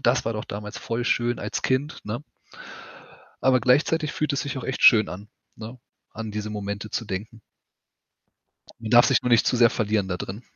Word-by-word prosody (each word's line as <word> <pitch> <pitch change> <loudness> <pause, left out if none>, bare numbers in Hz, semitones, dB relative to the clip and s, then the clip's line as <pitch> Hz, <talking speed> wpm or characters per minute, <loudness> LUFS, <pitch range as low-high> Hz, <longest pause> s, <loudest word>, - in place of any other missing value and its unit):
das - - +2
war 115 - -1
doch 110 -1 -5
damals 105 +1 -7
voll 115 +1 -3
schön 120 0 0
als - - -4
Kind, 135 +4 -1
ne? 110 +6 -5 1.2
Aber 130 -1 +3
gleichzeitig 150 +5 +2
fühlt 150 - -1
es 140 - -1
sich 140 -1 -4
auch 130 - -5
echt 130 - -4
schön 110 -4 +7
an, 100 +3 -9 0.3
ne, 115 +3 -9 0.3
an 110 0 -6
diese 105 0 -5
Momente 100 0 -5
zu 115 - -3
denken. 110 +3 -6 1.4
Man 110 - -5
darf 120 +1 +7
sich 135 - +2
nur - - -1
nicht 120 -2 +4
zu - - +2
sehr 120 -1 +6
verlieren 105 -3 -1
da 90 - -2
drin. 95 +5 -7
115 Hz, 195 wpm, -24 LUFS, 105-125 Hz, 1.4 s, schön